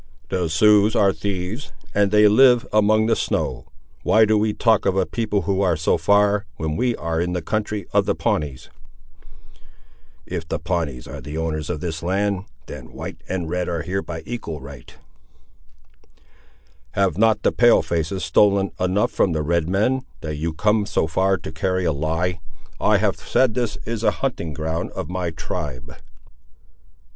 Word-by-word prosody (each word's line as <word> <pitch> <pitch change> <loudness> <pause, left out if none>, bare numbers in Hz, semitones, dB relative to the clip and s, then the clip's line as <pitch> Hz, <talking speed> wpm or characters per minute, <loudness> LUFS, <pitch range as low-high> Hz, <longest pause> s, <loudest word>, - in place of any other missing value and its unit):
"The 90 -2 0
Siouxes 105 +6 +4
are 100 -1 +4
thieves, 100 +6 -4 0.2
and 100 -1 +3
they 105 +1 +6
live 120 +3 +5
among 110 +1 +4
the 115 0 +2
snow; - - -2 0.3
why 110 +1 +4
do 110 0 +2
we 105 0 +2
talk 110 -1 +2
of 95 0 +1
a 95 - +2
people 105 -3 -1
who 95 +3 0
are 90 -4 +2
so 80 - +2
far, 100 0 +2
when 80 -1 -2
we 120 +7 +1
are 80 0 -2
in 90 +1 -1
the 90 - -2
country 105 +1 -2
of - - +3
the - - +1
Pawnees?" 70 -4 -2 1.5
"If 80 - -5
the - - -2
Pawnees 80 -7 -3
are 70 +2 -8
the 75 +4 -6
owners 80 -1 -3
of 80 -4 -3
this 80 -2 -4
land, 100 +2 -1 0.2
then - - -10
white - - -7
and 90 -3 -2
red 90 +2 -2
are 85 -2 -2
here 95 +4 -2
by 80 -3 -7
equal 115 -11 -5
right." 70 -2 -11 2.0
"Have 100 -1 +1
not 110 -2 +3
the - - +3
pale 120 -6 +5
faces 85 +3 -2
stolen 100 +3 +3
enough 95 +3 +1
from 90 - +1
the 75 -1 -1
red 85 +1 0
men, 110 +8 +1 0.2
that 75 -1 -4
you 80 +3 -2
come 105 +5 +1
so 100 - +1
far 95 +4 +1
to 80 -1 -8
carry 95 +3 -1
a 80 - +2
lie? 80 +5 -1 0.4
I - - +3
have - - 0
said 130 -4 +1
that 125 - 0
this 115 -4 -2
is 115 -1 -4
a - - +5
hunting 115 - -3
ground 80 +3 -3
of - - -5
my 90 -2 -2
tribe." 70 -6 -6
95 Hz, 175 wpm, -22 LUFS, 80-105 Hz, 2.0 s, they